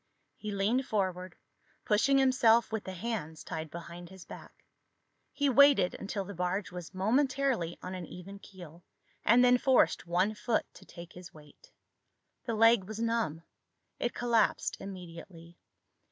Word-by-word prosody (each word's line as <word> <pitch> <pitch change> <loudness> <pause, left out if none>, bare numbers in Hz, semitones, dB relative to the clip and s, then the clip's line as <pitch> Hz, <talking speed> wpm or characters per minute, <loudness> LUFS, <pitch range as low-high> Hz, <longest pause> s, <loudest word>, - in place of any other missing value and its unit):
He 215 - -7
leaned 215 +7 0
forward, 185 -3 -2 0.5
pushing 250 +6 +3
himself 245 -4 +4
with 220 -2 -3
the 190 - -6
hands 180 -6 -5
tied 160 -2 -6
behind 170 +1 -9
his 190 -1 -13
back. - - -13 0.7
He 285 - 0
waited 280 -7 +5
until 200 0 -5
the 200 - -8
barge 180 +3 -2
was 180 0 -9
momentarily 255 - 0
on 180 - -6
an 180 -3 -6
even 195 +3 -10
keel 175 -4 -13 0.4
and 245 +3 +5
then 250 0 +5
forced 260 -8 +2
one 180 +5 +1
foot 215 +2 -1
to - - -16
take 170 -1 -12
his 180 -2 -12
weight. 155 - -18 0.7
The 230 - -2
leg 225 -2 +5
was 220 +2 -7
numb. 230 -9 -1 0.6
It 240 - -2
collapsed 235 -2 +1
immediately. 170 -2 -10
195 Hz, 145 wpm, -30 LUFS, 175-235 Hz, 0.7 s, waited